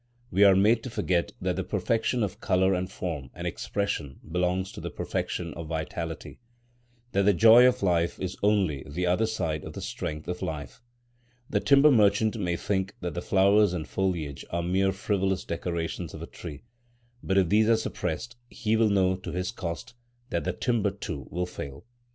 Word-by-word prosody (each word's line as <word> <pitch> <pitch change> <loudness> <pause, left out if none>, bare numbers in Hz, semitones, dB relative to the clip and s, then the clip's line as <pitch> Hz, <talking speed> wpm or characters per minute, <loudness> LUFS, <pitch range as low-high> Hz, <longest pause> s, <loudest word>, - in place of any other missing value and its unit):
We 100 +3 +4
are 100 -1 +7
made 110 +4 +4
to 130 - -6
forget 90 -6 0
that - - -1
the - - -1
perfection 115 +1 0
of 100 - -4
colour 95 +1 +3
and 90 +1 -2
form 80 -9 -4
and - - -6
expression 90 -9 -3
belongs 90 +3 0
to - - -9
the - - -4
perfection 85 -2 -3
of 85 -2 -7
vitality,—that 120 +8 -6
the 100 +1 +4
joy 115 +5 +8
of 125 -3 +1
life 85 -2 +1
is 95 0 -3
only 100 -9 +2
the 85 +5 -2
other 90 +5 +2
side 85 -9 -2
of - - -8
the - - -7
strength 75 0 -5
of 90 0 -4
life. 75 - -5 0.7
The - - +2
timber 140 +2 +6
merchant 105 -1 +4
may 90 -5 -1
think 95 +1 -2
that 90 -3 -3
the 85 - -3
flowers 100 +1 +4
and 80 -4 -4
foliage 85 -7 -2
are 85 0 -2
mere 95 +2 +2
frivolous 95 -1 -1
decorations 85 0 -3
of - - -7
a - - -4
tree; 70 - -9 0.6
but 95 - 0
if 95 -4 +3
these 110 +2 +4
are 115 - +5
suppressed, 110 +2 -4
he 110 -1 0
will 110 -1 +4
know 95 -2 +3
to 95 - -7
his 90 +3 -2
cost 85 -2 -6 0.4
that 85 - -1
the 90 - 0
timber 115 -1 +1
too 70 -7 -6
will 90 +1 -2
fail. 70 -5 -8
95 Hz, 185 wpm, -27 LUFS, 85-105 Hz, 0.7 s, joy